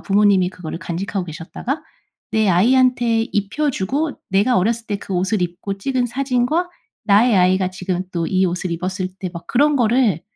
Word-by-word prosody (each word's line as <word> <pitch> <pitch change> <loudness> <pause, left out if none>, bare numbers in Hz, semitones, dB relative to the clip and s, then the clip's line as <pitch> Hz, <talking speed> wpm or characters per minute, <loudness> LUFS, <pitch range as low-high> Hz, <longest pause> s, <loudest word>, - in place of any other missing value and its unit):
부모님이 200 -2 +3
그거를 180 -3 -7
간직하고 185 +2 -4
계셨다가 180 - -5 0.5
내 220 -2 +2
아이한테 240 +4 +3
입혀 210 +9 -1
주고 280 +8 -2
내가 205 +6 +3
어렸을 230 +4 0
때 205 - -2
그 195 - -8
옷을 185 +2 0
입고 180 +3 -4
찍은 250 +4 -1
사진과 265 +7 0 0.3
나의 215 +1 +4
아이가 185 +1 +3
지금 185 0 -3
또 170 -2 -1
이 185 +1 +2
옷을 180 +1 -3
입었을 185 +2 -3
때 185 - -4
막 170 -1 -9
그런 290 +3 +3
거를 230 - +2
200 Hz, 350 characters per minute, -20 LUFS, 185-245 Hz, 0.5 s, 나의